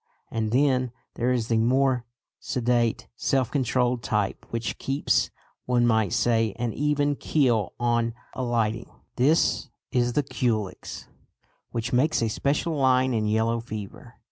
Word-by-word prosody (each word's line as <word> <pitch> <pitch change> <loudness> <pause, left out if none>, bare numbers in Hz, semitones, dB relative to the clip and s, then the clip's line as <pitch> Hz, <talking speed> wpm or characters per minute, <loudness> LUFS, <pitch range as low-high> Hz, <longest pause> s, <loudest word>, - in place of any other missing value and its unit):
And 110 -1 -1
then 130 -1 +2 0.2
there 120 +2 0
is 120 -3 0
the 115 -1 +2
more 125 +1 +2 0.3
sedate 120 -2 0
self 130 -1 0
controlled 125 -2 +1
type 105 -2 -1
which 115 0 -3
keeps, 135 +2 +1 0.4
one 120 -1 +3
might 110 -5 +2
say, 115 -3 +2
an 120 -1 -2
even 145 0 +1
keel 120 -9 +1
on 120 -1 +1 0.2
alighting. 115 -3 -1 0.3
This 145 +6 +2 0.2
is 120 -1 +1
the 145 - +2
Culex, 110 -7 -3 0.6
which 115 +1 -3
makes 130 +1 +2
a 115 - +1
"special 145 +8 0
line" 130 -2 +3
in 110 -2 0
yellow 110 +2 +1
fever. 110 -4 -8
120 Hz, 135 wpm, -26 LUFS, 115-130 Hz, 0.6 s, one